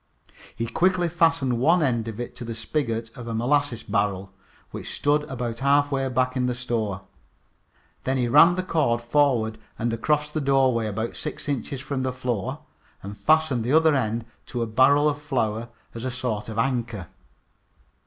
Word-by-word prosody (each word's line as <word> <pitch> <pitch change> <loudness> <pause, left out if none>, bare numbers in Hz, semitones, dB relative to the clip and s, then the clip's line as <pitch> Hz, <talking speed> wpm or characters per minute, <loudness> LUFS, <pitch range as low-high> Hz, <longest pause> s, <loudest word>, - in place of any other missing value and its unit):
He 115 - -2
quickly 175 +9 +2
fastened 165 -7 +2
one 165 +6 +4
end 120 -5 0
of 110 0 -6
it 120 0 -5
to - - -6
the 115 -1 -5
spigot 115 -2 -3
of 120 -1 -8
a 115 - -3
molasses 130 +1 +1
barrel, 100 -2 -1 0.4
which - - -6
stood 145 +1 +2
about 120 -3 -4
half 145 +1 +3
way 135 -1 0
back 130 0 0
in 125 -1 +1
the 125 - -1
store. 110 -6 -2 1.0
Then 130 +1 0
he 125 -1 +1
ran 165 +8 +7
the 185 - -1
cord 135 -10 +1
forward 120 -4 +2 0.2
and 115 0 -1
across 150 +6 0
the 155 - -2
doorway, 130 -5 +2
about 110 +2 -3
six 150 - -5
inches 140 -1 -3
from 140 -2 -3
the 130 0 -1
floor, 125 -5 -3 0.4
and 100 +1 -7
fastened 140 +3 +2
the 125 +5 0
other 160 0 +5
end 115 -4 -1 0.2
to 120 -2 -2
a - - -1
barrel 130 +6 +4
of 145 -1 -1
flour 120 -5 -1 0.2
as 115 - -7
a 130 - -1
sort 120 -4 -3
of 110 - -6
anchor. 115 -5 -1
125 Hz, 180 wpm, -25 LUFS, 115-145 Hz, 1.0 s, ran